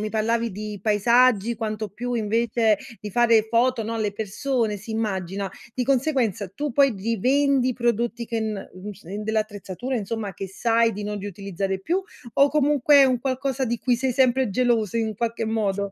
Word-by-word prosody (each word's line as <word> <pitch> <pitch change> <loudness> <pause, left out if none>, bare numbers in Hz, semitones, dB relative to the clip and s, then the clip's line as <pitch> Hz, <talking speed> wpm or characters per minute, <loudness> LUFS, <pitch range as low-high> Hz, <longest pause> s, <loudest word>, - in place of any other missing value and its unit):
mi 215 - -2
parlavi 230 +2 0
di 210 0 -6
paesaggi, 235 +1 +3
quanto 215 -1 -3
più 245 +5 -4
invece 225 0 +2 0.2
di 210 - -6
fare 230 0 +4
foto, 235 +1 +2
no, 225 +2 -3
alle 215 -2 -1
persone 220 +2 -1
si 205 +3 -10
immagina, 195 -3 -2 0.3
di 250 - -1
conseguenza 250 - +1
tu 290 +4 -3
poi 275 +1 +4
rivendi 255 +6 +2
i - - +1
prodotti 235 0 -1
che 230 0 -2
n 215 -3 -4
mhmm, 185 +3 -7
s 195 - -17
in 200 +5 -5
dell'attrezzatura 215 +2 -3
insomma 215 -1 -3
che 195 +2 -6
sai 230 +3 +2
di 210 0 -5
non 210 0 -3
riutilizzare 195 -1 -4
più 350 - -1 0.3
o 280 +1 +5
comunque 295 -1 +3
è 280 - +8
un 255 -2 +1
qualcosa 265 0 -1
di 235 -1 -2
cui 250 +1 +1
sei 260 +1 0
sempre 260 -2 +2
geloso 230 -2 +1
in 220 -1 -1
qualche 230 0 -2
modo? 200 -3 -1
225 Hz, 180 wpm, -24 LUFS, 210-250 Hz, 0.3 s, è